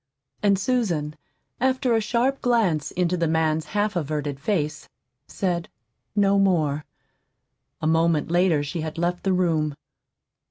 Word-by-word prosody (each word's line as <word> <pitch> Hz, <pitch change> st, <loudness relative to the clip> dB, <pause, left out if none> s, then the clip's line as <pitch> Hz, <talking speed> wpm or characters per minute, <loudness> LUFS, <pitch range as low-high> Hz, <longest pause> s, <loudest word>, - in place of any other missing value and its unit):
And 200 Hz, -2 st, +3 dB
Susan, 185 Hz, -9 st, -1 dB, 0.4 s
after 260 Hz, 0 st, +1 dB
a 225 Hz, -, +3 dB
sharp 245 Hz, +5 st, 0 dB
glance 210 Hz, -11 st, +1 dB
into 180 Hz, 0 st, 0 dB
the 170 Hz, -2 st, 0 dB
man's 160 Hz, -1 st, +1 dB
half 205 Hz, +4 st, -1 dB
averted 150 Hz, -3 st, -2 dB
face, 150 Hz, -4 st, -2 dB, 0.4 s
said 175 Hz, -3 st, -2 dB, 0.5 s
no 200 Hz, -1 st, +3 dB
more. 155 Hz, -7 st, +1 dB, 1.0 s
A -, -, +1 dB
moment 165 Hz, 0 st, +2 dB
later 175 Hz, -4 st, +3 dB
she 150 Hz, +3 st, -4 dB
had 155 Hz, 0 st, -5 dB
left 175 Hz, +1 st, -1 dB
the 195 Hz, -, +1 dB
room. 160 Hz, -5 st, +1 dB
175 Hz, 130 wpm, -24 LUFS, 155-205 Hz, 1.0 s, And